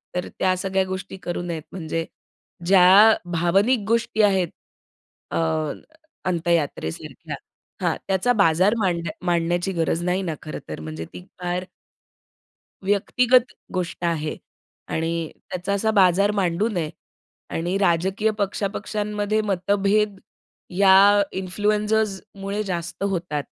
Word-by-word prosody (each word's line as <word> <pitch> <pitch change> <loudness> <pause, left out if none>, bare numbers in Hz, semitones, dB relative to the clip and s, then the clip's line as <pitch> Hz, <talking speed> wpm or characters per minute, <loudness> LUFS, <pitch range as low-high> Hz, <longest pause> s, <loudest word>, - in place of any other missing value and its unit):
तर 180 - -2
त्या 185 -1 +3
सगळ्या 190 0 0
गोष्टी 190 +1 -6
करू 175 0 -3
नयेत. 170 -3 -4
म्हणजे 165 -2 -3 0.6
ज्या 195 +4 +7 0.2
भावनिक 195 +9 +3
गोष्टी 230 -1 +1
आहेत 190 -5 +3 0.8
अ, - - -1 0.9
अंत्ययात्रेसारख्या 165 - -2 0.5
हां. - - +1
त्याचा 195 +6 +2
बाजार 190 +1 +4
मांड 175 -5 0 0.2
मांडण्याची 175 +2 +1
गरज 165 0 0
नाही 180 +2 0
ना, 165 -4 -3
खरंतर. 80 - -7
म्हणजे 80 +1 -6
ती 90 - -8 0.2
फार 180 +1 -2 1.2
व्यक्तिगत 245 +5 +3 0.3
गोष्ट 180 -1 -3
आहे 155 -2 -1 0.5
आणि 165 0 -2 0.2
त्याचा 185 +2 -2
असा 220 +2 +1
बाजार 200 0 +4
मांडू 185 +2 +1
नये. 170 -7 -2 0.6
आणि 175 +4 -1
राजकीय 190 +3 +1
पक्ष-पक्षांमध्ये 210 +1 -1
मतभेद 200 +1 +1 0.6
या 200 +1 +7
इन्फ्लुएन्सर्समुळे 205 +1 -1
जास्त 175 -1 -4
होतात. 175 -7 -2
190 Hz, 105 wpm, -23 LUFS, 170-205 Hz, 1.2 s, ज्या